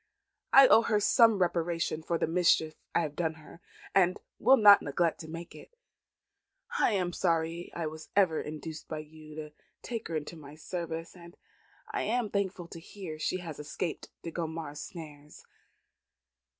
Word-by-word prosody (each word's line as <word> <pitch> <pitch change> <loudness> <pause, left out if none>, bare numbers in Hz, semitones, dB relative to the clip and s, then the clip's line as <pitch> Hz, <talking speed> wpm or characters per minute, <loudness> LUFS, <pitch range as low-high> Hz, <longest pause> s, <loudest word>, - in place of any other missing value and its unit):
I 270 0 +9
owe 225 - +7
her 220 -2 +1
some 225 +1 +5
reparation 170 -3 0
for 170 +1 -1
the - - +1
mischief 165 -2 +2 0.2
I - - +4
have 150 -3 -4
done 160 -1 -1
her, 160 +2 -15 0.3
and 185 -1 +3 0.2
will 270 - +6
not 205 -3 +8
neglect 165 +3 0
to 160 - -8
make 165 +2 -8
it. 480 - -14 1.0
I - - +3
am 180 -3 0
sorry 165 0 -1
I - - -4 0.3
ever 185 -6 +4
was - - -5
induced 155 +1 -7
by 155 - -4
you 155 0 -11
to 155 -1 -7 0.3
take 230 -2 -4
her 165 - -4
into 155 +2 -4
my 150 -2 -12
service; 165 +1 -5
and 170 0 -14 0.5
I 415 - -1
am 230 0 -1
thankful 190 -3 -2
to 165 - -9
hear 165 -2 -8
she 185 - -1
has 160 -4 -7
escaped 155 +3 -4
De 165 - -5
Gondomar's 160 -3 -5
snares." 150 -4 -10
165 Hz, 165 wpm, -30 LUFS, 155-185 Hz, 1.0 s, I